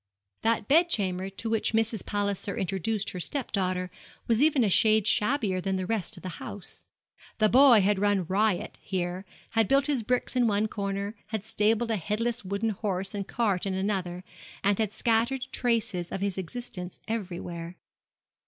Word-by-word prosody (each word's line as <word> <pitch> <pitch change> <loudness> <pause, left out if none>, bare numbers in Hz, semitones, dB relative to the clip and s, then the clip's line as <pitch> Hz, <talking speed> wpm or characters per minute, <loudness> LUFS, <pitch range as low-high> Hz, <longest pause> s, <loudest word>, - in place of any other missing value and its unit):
That 225 -2 +1
bed 335 +5 +5
chamber 190 - 0
to 195 +4 -6
which 225 0 0
Mrs. 225 -2 +1
Palliser 200 -1 -2
introduced 195 +3 -1
her 180 - -6
step 265 - -2
daughter 185 -2 -1 0.3
was 230 +1 +2
even 290 -4 +4
a - - +3
shade 215 +1 +4
shabbier 210 -4 +1
than 195 +1 -1
the 185 -1 -2
rest 205 -3 -2
of - - -12
the 185 -2 -6
house. 205 - -8 0.5
The 215 -1 +4
boy 250 -3 +7
had 200 0 +2
run 205 -2 +2
riot 195 +2 0
here, 185 0 -3 0.3
had 225 -2 +3
built 275 0 +3
his 280 -4 +1
bricks 250 +3 -1
in 245 -2 +3
one 210 0 +2
corner, 200 0 -3
had 215 -2 -4
stabled 225 +1 +1
a 220 - +1
headless 225 +6 -1
wooden 200 +4 -1
horse 195 -2 -2
and 200 -1 -4
cart 205 -5 0
in 190 - -1
another, 190 -2 -2 0.4
and 200 +1 +2
had 215 -3 +1
scattered 235 +4 +1
traces 225 -7 0
of - - -3
his 195 -1 -1
existence 190 -1 -6
everywhere. 175 -5 -5
205 Hz, 170 wpm, -28 LUFS, 190-225 Hz, 0.5 s, boy